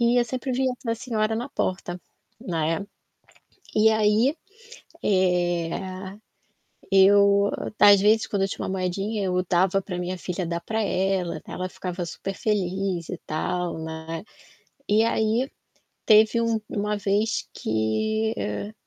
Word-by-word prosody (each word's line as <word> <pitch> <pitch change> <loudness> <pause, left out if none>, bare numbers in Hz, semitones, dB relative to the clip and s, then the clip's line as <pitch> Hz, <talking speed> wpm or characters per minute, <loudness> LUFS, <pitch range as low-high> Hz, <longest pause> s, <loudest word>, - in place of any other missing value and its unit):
E 235 +1 +3
eu 240 - +3
sempre 255 +2 -3
via 260 0 +1
a 230 - +1
senhora 220 -2 -1
na 240 +5 -3
porta, 180 -7 -3 0.4
né. 165 +2 -1 0.9
E 215 +1 +5
aí, 220 +7 +3 0.7
eh, 185 +1 0 0.7
eu 200 +1 +5 0.3
às 205 -1 +8
vezes 215 +2 +4
quando 200 -2 -1
eu 195 - +1
tinha - - -4
uma - - -5
moedinha 195 +3 -2
eu 180 -1 0
dava 190 +1 +3
pra 180 -2 -5
minha 180 +1 -3
filha 180 0 -3
dar 170 0 -2
pra 220 +6 -2
ela, 185 -4 0
ela 185 0 -4
ficava 180 -1 -5
super 195 +3 -5
feliz 190 -3 -1
e - - -4
tal, 175 +2 -2
né. 160 +2 -6 0.6
E 215 +2 +4
aí, 230 +3 +1 0.6
teve 220 +2 +6
um 230 -1 +1
uma 210 0 -1
vez 205 +2 0
que 215 - 0
e 105 - -4
195 Hz, 135 wpm, -25 LUFS, 180-220 Hz, 0.9 s, às